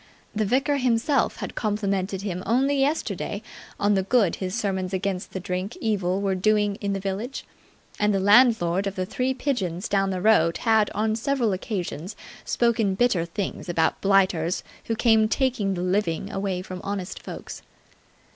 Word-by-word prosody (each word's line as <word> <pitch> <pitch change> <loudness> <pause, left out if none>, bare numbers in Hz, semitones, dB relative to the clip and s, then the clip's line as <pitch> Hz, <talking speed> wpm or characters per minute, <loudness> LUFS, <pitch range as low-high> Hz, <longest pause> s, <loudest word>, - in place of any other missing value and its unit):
The 215 0 +1
vicar 270 +6 +1
himself 250 +1 +1
had - - -5
complimented 200 -3 -1
him 185 -3 -3
only 270 +4 +2
yesterday 290 +4 -1 0.4
on 205 +1 +3
the 195 - +2
good 200 -1 +2
his 185 0 -3
sermons 190 -2 -1
against 190 -1 -3
the 190 - -4
drink 185 +3 -4
evil 195 -4 0
were 195 -1 +1
doing 205 +1 +1
in 200 -1 -1
the 195 - -2
village, 200 +7 -4 0.5
and 210 0 +3
the 195 - +1
landlord 200 -3 +4
of 195 - -4
the 185 - -2
Three 255 +7 -1
Pigeons 195 - -2
down 195 -1 +1
the 185 -1 -2
road 200 -4 +4
had 220 -2 +3
on 215 +1 +1
several 235 -2 0
occasions 185 -1 -4 0.3
spoken 225 -5 +1
bitter 195 -6 +2
things 180 +1 -5
about 165 -2 +1
blighters 190 -4 +2 0.2
who 225 - -1
came 220 -1 +4
taking 235 -7 0
the 175 - -3
living 190 0 -1
away 195 -2 -2
from 185 -1 -7
honest 200 -2 -4
folks. - - -8
200 Hz, 165 wpm, -25 LUFS, 185-225 Hz, 0.5 s, landlord